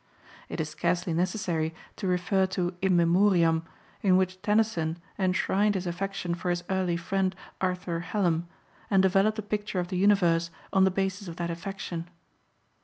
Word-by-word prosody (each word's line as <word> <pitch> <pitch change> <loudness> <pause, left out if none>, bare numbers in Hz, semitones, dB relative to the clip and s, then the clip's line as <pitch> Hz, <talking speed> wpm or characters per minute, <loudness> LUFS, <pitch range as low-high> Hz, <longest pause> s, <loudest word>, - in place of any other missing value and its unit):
It - - -5
is - - 0
scarcely 175 -1 -1
necessary 170 -2 -1 0.2
to 195 - -3
refer 185 +1 +2
to 180 -1 -2
In 190 -1 +3
Memoriam, 170 -2 +4 0.4
in 185 -2 +4
which 185 0 0
Tennyson 210 -7 +1 0.2
enshrined 195 +2 +2
his 190 -1 -2
affection 180 0 -3
for 175 +1 -3
his 175 0 0
early 185 -2 +1
friend, 185 +2 -1 0.3
Arthur 180 -2 -1
Hallam, 175 -2 0 0.4
and 195 -2 +4
developed 195 +3 +3
a 215 - -3
picture 210 -1 -2
of 175 0 -2
the 185 - -2
universe 175 -4 +3 0.2
on 190 -1 +5
the - - +4
basis 195 +1 -2
of 170 - -6
that 170 0 -3
affection. 170 -1 -5
185 Hz, 160 wpm, -28 LUFS, 170-195 Hz, 0.4 s, on